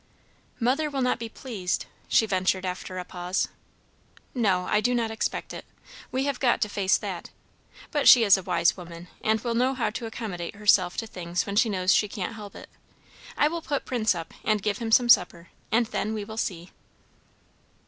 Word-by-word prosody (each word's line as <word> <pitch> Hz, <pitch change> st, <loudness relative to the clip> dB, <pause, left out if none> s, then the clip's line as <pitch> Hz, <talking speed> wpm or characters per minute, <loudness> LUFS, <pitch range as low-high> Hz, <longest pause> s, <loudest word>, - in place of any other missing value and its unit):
"Mother 270 Hz, +6 st, +1 dB
will 275 Hz, -2 st, -1 dB
not 250 Hz, -1 st, +1 dB
be 230 Hz, -1 st, -5 dB
pleased," 215 Hz, -7 st, -3 dB, 0.2 s
she 225 Hz, -, +4 dB
ventured 185 Hz, -1 st, 0 dB
after 185 Hz, 0 st, -5 dB
a 180 Hz, -, -4 dB
pause. 180 Hz, +2 st, -2 dB, 0.8 s
"No, 195 Hz, -7 st, +1 dB
I 210 Hz, -, +2 dB
do 245 Hz, +2 st, +1 dB
not 230 Hz, -2 st, 0 dB
expect 220 Hz, -, -3 dB
it. -, -, -7 dB, 0.5 s
We 260 Hz, +1 st, 0 dB
have 280 Hz, -2 st, -2 dB
got 245 Hz, -3 st, +2 dB
to 210 Hz, -, +1 dB
face 195 Hz, -1 st, +2 dB
that. -, -, -6 dB, 0.6 s
But 290 Hz, -3 st, +1 dB
she 240 Hz, -, +9 dB
is 200 Hz, -3 st, +7 dB
a 190 Hz, -, -3 dB
wise 170 Hz, -2 st, +2 dB
woman, 175 Hz, -1 st, -10 dB
and 220 Hz, 0 st, +2 dB
will 235 Hz, -1 st, -2 dB
know 255 Hz, +3 st, +1 dB
how 235 Hz, -4 st, -1 dB
to 230 Hz, +1 st, -5 dB
accommodate 200 Hz, -6 st, -6 dB
herself 200 Hz, -3 st, +3 dB
to 225 Hz, -, -2 dB
things 175 Hz, -4 st, -3 dB
when 200 Hz, -, -4 dB
she 230 Hz, +2 st, +4 dB
knows 185 Hz, -2 st, +2 dB
she 210 Hz, -, +3 dB
can't 200 Hz, +1 st, -5 dB
help 210 Hz, -3 st, -10 dB
it. -, -, -12 dB, 0.7 s
I 295 Hz, -, +4 dB
will 335 Hz, +2 st, -3 dB
put 285 Hz, -3 st, -3 dB
Prince 225 Hz, -6 st, +1 dB
up 165 Hz, -1 st, -7 dB
and 215 Hz, -2 st, +1 dB
give 210 Hz, -1 st, -1 dB
him 230 Hz, -2 st, -3 dB
some 240 Hz, +2 st, +5 dB
supper, 180 Hz, -6 st, +3 dB, 0.2 s
and 230 Hz, +2 st, +3 dB
then 220 Hz, -1 st, -3 dB
we 210 Hz, -2 st, -4 dB
will 220 Hz, -, -8 dB
see." 180 Hz, -5 st, -3 dB
215 Hz, 200 wpm, -26 LUFS, 185-240 Hz, 0.8 s, she